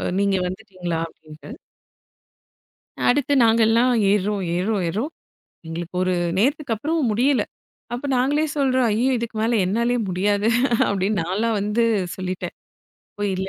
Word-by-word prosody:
அ -, -, -3 dB, 0.2 s
நீங்க, 200 Hz, -1 st, +2 dB
வந்துட்டீங்களா 185 Hz, -4 st, -5 dB
அப்படின்னு? 155 Hz, +2 st, -14 dB, 1.6 s
அடுத்து 285 Hz, +2 st, +2 dB
நாங்கல்லாம் 230 Hz, +2 st, +4 dB, 0.2 s
ஏறோம் 205 Hz, 0 st, 0 dB
ஏறோம் 195 Hz, +2 st, 0 dB
ஏறோம். 220 Hz, -, -2 dB, 0.6 s
எங்களுக்கு 170 Hz, +2 st, -6 dB
ஒரு 185 Hz, -, +1 dB, 0.2 s
நேரத்துக்கப்புறம் 280 Hz, +3 st, 0 dB
முடியல, 250 Hz, +3 st, +2 dB, 0.5 s
அப்போ 245 Hz, +4 st, -4 dB
நாங்களே 285 Hz, +5 st, +2 dB
சொல்றோம், 260 Hz, -3 st, +2 dB
அய்யயோ! 235 Hz, +5 st, +1 dB
இதுக்கு 230 Hz, -1 st, -5 dB
மேல 225 Hz, 0 st, +2 dB
என்னாலயே 235 Hz, +5 st, +1 dB
முடியாது, 205 Hz, +3 st, +1 dB, 0.4 s
அப்படின்னு 200 Hz, +1 st, 0 dB
நான்லாம் 215 Hz, +5 st, 0 dB
வந்து 210 Hz, +3 st, +1 dB, 0.3 s
சொல்லிட்டேன். 185 Hz, -1 st, -4 dB, 0.6 s
போயில்ல 190 Hz, -2 st, -1 dB
215 Hz, 115 wpm, -22 LUFS, 190-245 Hz, 1.6 s, நாங்கல்லாம்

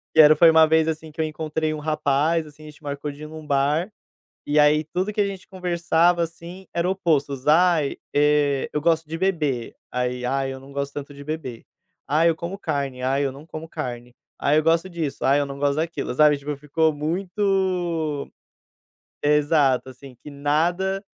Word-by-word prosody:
E -, -, +3 dB
era 150 Hz, +1 st, +8 dB
foi 165 Hz, +2 st, +7 dB
uma 160 Hz, 0 st, +7 dB
vez, 160 Hz, 0 st, +3 dB
assim, 160 Hz, 0 st, -4 dB
que 160 Hz, -, -17 dB
eu -, -, +1 dB
encontrei 155 Hz, 0 st, -2 dB
um 155 Hz, -, -5 dB
rapaz, 155 Hz, +1 st, +1 dB
assim, 150 Hz, +1 st, -15 dB
a 155 Hz, -, -10 dB
gente 150 Hz, 0 st, -17 dB
marcou 145 Hz, +1 st, -4 dB
de 145 Hz, +2 st, -11 dB
ir -, -, -6 dB
num 155 Hz, 0 st, -10 dB
bar, 145 Hz, +7 st, +1 dB, 0.5 s
e 150 Hz, +1 st, +2 dB
aí 150 Hz, +1 st, +4 dB
tudo 185 Hz, +6 st, -2 dB
que 205 Hz, -, +1 dB
a -, -, +2 dB
gente 195 Hz, -1 st, -8 dB
conversava, 175 Hz, -2 st, +1 dB
assim, 170 Hz, +3 st, -9 dB
eram 170 Hz, +2 st, 0 dB
opostos: 145 Hz, -7 st, -1 dB
"Ai, 160 Hz, -2 st, +4 dB, 0.2 s
eh, 145 Hz, -1 st, +2 dB
eu 150 Hz, -, -1 dB
gosto 160 Hz, -1 st, +1 dB
de 165 Hz, -, -4 dB
beber", 155 Hz, -10 st, -1 dB, 0.2 s
aí: 125 Hz, 0 st, -2 dB
"Ai, 135 Hz, +1 st, -1 dB
eu 130 Hz, -, -8 dB
não 135 Hz, +1 st, -14 dB
gosto 140 Hz, 0 st, -3 dB
tanto 145 Hz, 0 st, -7 dB
de 140 Hz, 0 st, -11 dB
beber". 150 Hz, -6 st, -6 dB, 0.5 s
"Ai, 160 Hz, +3 st, +4 dB
eu 165 Hz, -, +1 dB
como 170 Hz, +4 st, -6 dB
carne", 140 Hz, -6 st, -3 dB
"ai, 135 Hz, +2 st, +1 dB
eu 135 Hz, -, -1 dB
não 140 Hz, +3 st, -12 dB
como 160 Hz, 0 st, -8 dB
carne". 125 Hz, -6 st, -6 dB, 0.3 s
"Ai, 145 Hz, +2 st, +3 dB
eu 155 Hz, -, +3 dB
gosto 165 Hz, +3 st, +2 dB
disso", 165 Hz, -5 st, -4 dB
"ai 140 Hz, +2 st, +4 dB
eu 145 Hz, -, 0 dB
não 140 Hz, 0 st, -7 dB
gosto 145 Hz, -1 st, +1 dB
daquilo", 165 Hz, -3 st, -2 dB
sabe, 150 Hz, +2 st, +5 dB
tipo, 145 Hz, +1 st, -5 dB
ficou 155 Hz, +3 st, +1 dB
muito 175 Hz, -1 st, -1 dB, 0.9 s
exato, 145 Hz, -3 st, +2 dB
assim, 130 Hz, 0 st, -13 dB
que 150 Hz, -, -9 dB
nada 175 Hz, +7 st, 0 dB
155 Hz, 195 wpm, -23 LUFS, 140-165 Hz, 0.9 s, era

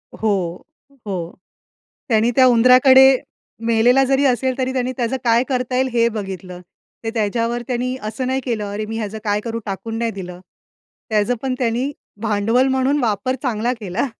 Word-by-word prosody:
हो, 190 Hz, -5 st, -1 dB, 0.5 s
हो. 175 Hz, -4 st, -4 dB, 0.8 s
त्यानी 225 Hz, 0 st, +3 dB
त्या 260 Hz, -, +6 dB
उंदराकडे 255 Hz, +2 st, +6 dB, 0.5 s
मेलेला 240 Hz, +4 st, +4 dB
जरी 270 Hz, +1 st, +2 dB
असेल, 260 Hz, 0 st, +1 dB
तरी 260 Hz, 0 st, -1 dB
त्यांनी 255 Hz, -1 st, -1 dB
त्याचं 245 Hz, +1 st, -1 dB
काय 235 Hz, +1 st, +3 dB
करता 255 Hz, -2 st, -2 dB
येईल 260 Hz, +1 st, +2 dB
हे 235 Hz, -1 st, +3 dB
बघितलं. 190 Hz, -5 st, -6 dB, 0.4 s
ते 225 Hz, -, -1 dB
त्याच्यावर 230 Hz, +2 st, -1 dB
त्यांनी 255 Hz, +1 st, -2 dB
असं 220 Hz, +4 st, -4 dB
नाही 260 Hz, +1 st, 0 dB
केलं, 230 Hz, -5 st, -2 dB
अरे 210 Hz, +1 st, -3 dB
मी 225 Hz, +1 st, -5 dB
ह्याचं 215 Hz, -1 st, -4 dB
काय 205 Hz, -1 st, 0 dB
करू? 230 Hz, +1 st, -4 dB
टाकून 225 Hz, +3 st, -4 dB
नाही 230 Hz, 0 st, 0 dB
दिलं, 180 Hz, -4 st, -8 dB, 0.7 s
त्याच 210 Hz, 0 st, +1 dB
पण 265 Hz, -1 st, -1 dB
त्यानी 245 Hz, +2 st, 0 dB, 0.3 s
भांडवल 225 Hz, +4 st, +1 dB
म्हणून 265 Hz, +2 st, +1 dB
वापर 235 Hz, +3 st, 0 dB
चांगला 240 Hz, -2 st, -1 dB
केला. 205 Hz, +5 st, -2 dB
235 Hz, 160 wpm, -20 LUFS, 210-255 Hz, 0.8 s, त्या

